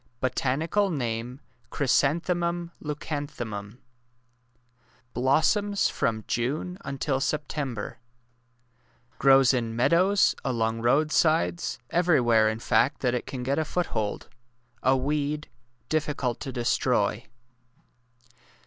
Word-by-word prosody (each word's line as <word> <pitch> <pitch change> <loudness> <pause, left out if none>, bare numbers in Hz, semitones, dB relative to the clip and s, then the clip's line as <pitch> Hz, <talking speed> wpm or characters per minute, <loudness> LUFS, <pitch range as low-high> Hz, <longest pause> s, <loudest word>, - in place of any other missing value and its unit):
Botanical 155 +10 0
name 125 -3 -3 0.3
Chrysanthemmn 170 +5 +1
Leucan 150 -1 -4
tliemum. 105 -5 -7 1.4
Blossoms 160 - +2
from 110 -1 -1
Jmie 145 - -2
until 135 0 -2
September. 140 -7 -3 1.2
Grows 135 -2 +6
in 115 -3 -1
meadows, 180 - +3
along 115 -3 -1
roadsides— 135 - +2
every 175 -3 +3
where, 115 -3 +4
in 110 - -3
fact, 135 +5 +1
that 125 -2 +1
it 125 - -3
can 130 -2 -5
get 140 +4 0
a - - +1
foothold— 150 -11 -2 0.5
a 130 +1 +3
weed— 150 +2 -2 0.4
difficult 145 -5 -1
to 135 - -5
destroy. 120 -3 0
135 Hz, 95 wpm, -26 LUFS, 120-155 Hz, 1.4 s, Grows